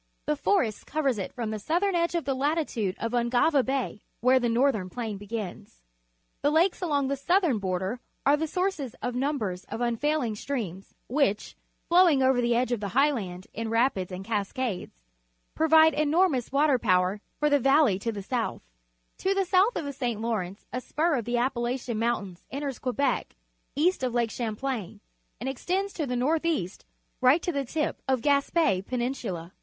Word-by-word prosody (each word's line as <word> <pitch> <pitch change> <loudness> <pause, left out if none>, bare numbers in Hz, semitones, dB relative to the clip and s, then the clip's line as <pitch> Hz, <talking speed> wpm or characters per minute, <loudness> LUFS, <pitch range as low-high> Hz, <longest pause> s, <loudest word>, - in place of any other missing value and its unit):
The 300 - +1
forest 275 - 0
covers 275 -7 0
it 190 - -4
from 230 -3 -4
the 215 - -3
southern 355 - 0
edge 340 0 +1
to 340 - +1
the 270 -1 -2
lati 295 +4 0
tude 200 -5 -2
of 230 - -3
Ungava 245 +4 +3
Bay, 260 -5 -2 0.2
where 255 +2 +4
the 240 -1 0
Northern 230 -5 +2
Plain 220 -2 -4
begins. 205 - -7 0.6
The 290 - +3
lakes 335 +6 +2
along 290 -6 +1
the 280 - 0
southern 325 - +2
border 190 +4 -2 0.3
are 280 +2 +6
the 320 +2 -2
sources 360 - -2
of 245 - -1
numbers 245 -9 -2
of - - -6
unfaihnii 240 0 0
streams, 205 -9 -5
which, 245 -6 0 0.3
flowing 340 -6 +5
over 260 -1 +3
the 240 0 +2
edge 245 +1 +1
of 240 - 0
the 205 +3 -4
highland 210 -11 +1
in 225 0 -4
rapids 230 -5 +1
and 185 +1 -6
cascades, 205 - -3 0.5
provide 320 0 +5
enor 315 +5 +3
mous 250 -4 -2
water 280 -1 +3
power 185 +1 +2 0.2
for 300 0 +2
the 285 - +5
valley 270 -6 +4
to 230 +3 -2
the 205 -3 -6
soutli. 240 +3 -2 0.6
To 390 +1 +1
the 390 -1 +1
south 385 +6 +3
of - - -2
the 285 - -4
St. 245 -5 -2
Lawrence 210 -4 -3
a 250 - -2
spur 320 +6 0
of 240 -6 -1
the 240 0 0
Appalachian 240 -1 -1
Mountait^s 205 -6 -2
enters 275 -1 -4
Quebec 265 +2 -1 0.4
east 340 +5 +2
of 250 -2 -1
Lake 235 -2 +1
Champlain 225 -3 -4 0.4
and 245 - -4
extends 370 +9 -2
to 305 -4 -3
the 250 - -2
north 300 +7 +1
east 210 - -2 0.4
right 260 +7 +5
to 350 - 0
the 280 -4 -2
tip 305 +4 -2
of 260 -2 +1
Gaspe 280 - +2
Penin 250 +4 -2
sula. 180 -7 -6
255 Hz, 180 wpm, -27 LUFS, 220-295 Hz, 0.6 s, are